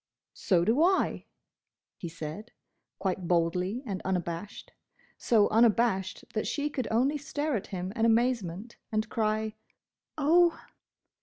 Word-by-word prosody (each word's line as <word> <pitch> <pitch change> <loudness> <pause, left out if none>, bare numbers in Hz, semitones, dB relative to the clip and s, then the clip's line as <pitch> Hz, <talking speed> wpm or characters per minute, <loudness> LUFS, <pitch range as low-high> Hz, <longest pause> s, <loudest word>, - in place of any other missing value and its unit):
"So 175 -4 +1
do 235 +8 +3
I!" 375 +3 +2 0.7
he 170 - -6
said, 165 +7 -7 0.4
quite 185 -2 -2
boldly 180 +7 0
and 195 -5 -4
unabashed: 180 +1 -4 0.4
so 215 -3 +3
unabashed 220 -4 +2
that 215 - -1
she 295 0 -2
could 260 -4 -3
only 265 +6 +1
stare 290 0 -2
at 205 - -3
him 185 0 -5
in 225 - -1
amazement 230 -3 +1
and 215 0 0
cry 215 -1 -1 0.6
"Oh!" 335 +3 +4
215 Hz, 125 wpm, -29 LUFS, 185-250 Hz, 0.7 s, Oh